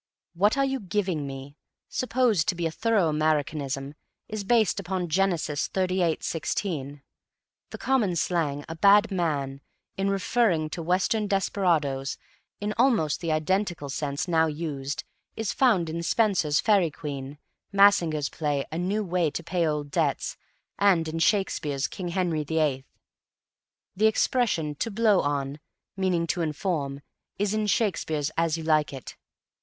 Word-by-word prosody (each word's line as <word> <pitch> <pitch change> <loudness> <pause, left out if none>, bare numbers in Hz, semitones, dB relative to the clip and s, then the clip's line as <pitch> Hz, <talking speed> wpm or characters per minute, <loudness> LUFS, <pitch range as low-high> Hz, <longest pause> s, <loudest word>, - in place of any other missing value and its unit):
"What 205 +9 +2
are 275 - +3
you 270 0 -1
giving 185 - -2
me," 135 +2 -8 0.3
supposed 245 -8 +1
to 185 - +1
be 170 -1 -2
a 165 - 0
thorough 220 -1 +2
Americanism, 150 -3 -1 0.3
is 215 -1 -4
based 220 0 +2
upon 185 -2 -3
Genesis, 170 -4 0
xxxviii:16. 165 -5 -1 0.7
The - - -7
common 230 -10 +1
slang, 155 -4 -1
"a 165 - -6
bad 205 +5 +5
man," 145 -7 -1 0.4
in 195 +1 0
referring 195 -5 +1
to 170 - -4
Western 190 +5 +1
desperadoes, 165 -9 0 0.4
in 210 +1 -2
almost 225 - +2
the 165 -2 -1
identical 165 -1 0
sense 140 +3 -2
now 160 -2 +3
used, 145 -3 -4 0.3
is 225 -2 -2
found 215 -11 +3
in 165 +1 -3
Spenser's 170 -6 +2
Faerie 200 -6 +3
Queen, 145 -2 -6 0.3
Massinger's 175 -8 +4
play 145 -3 -1
"A 160 - -3
New 200 +4 0
Way 180 -3 +1
to 170 - -5
Pay 170 -1 0
Old 150 -2 -2
Debts," - - 0 0.4
and 185 -5 +4
in 160 +1 -3
Shakespeare's 165 -7 +1
"King 185 - -6
Henry 170 -3 0
VIII." 150 -3 0 1.1
The 215 +3 +4
expression 220 - +1
"to 230 - -2
blow 215 -2 +3
on," 140 0 -2 0.4
meaning 185 -3 +1
to 170 +1 -1
inform, 150 -4 -2 0.4
is 205 +1 0
in 215 -1 0
Shakespeare's 160 -9 0
"As 165 -1 +1
You 165 - -6
Like 155 -1 +2
it." 135 -3 -8
170 Hz, 140 wpm, -26 LUFS, 150-200 Hz, 1.1 s, bad